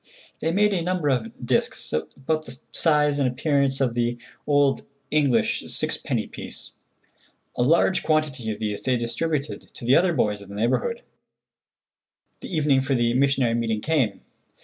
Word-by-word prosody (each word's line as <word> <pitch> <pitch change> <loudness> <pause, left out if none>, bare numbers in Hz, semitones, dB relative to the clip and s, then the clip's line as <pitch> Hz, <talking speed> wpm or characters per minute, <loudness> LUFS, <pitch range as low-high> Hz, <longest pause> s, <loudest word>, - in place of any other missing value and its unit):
They 160 - 0
made 205 +3 +3
a 180 - 0
number 175 -3 0
of 120 -4 -2
disks, - - -1
about 145 - -2
the 125 - -8
size 150 -3 +2
and 135 - +3
appearance 140 +1 +1
of 130 -4 +1
the 120 0 0 0.3
old 145 -2 +3 0.3
English 140 -7 +2
six - - -1
penny - - -2
piece. - - -8 0.8
A - - -1
large 165 +8 +3
quantity 150 -7 0
of 105 - -6
these 105 -2 -2
they 130 -1 +1
distributed 140 +6 -2
to 120 - -11
the 125 +3 +5
other 180 0 +4
boys 105 -7 0
of 100 - -13
the 100 - -8
neighborhood. 300 - 0 1.4
The - - -8
evening 150 -5 +3
for 135 0 0
the 120 -1 +2
missionary 135 -2 +2
meeting 115 -2 -1
came. 130 -10 0
135 Hz, 160 wpm, -24 LUFS, 120-155 Hz, 1.4 s, the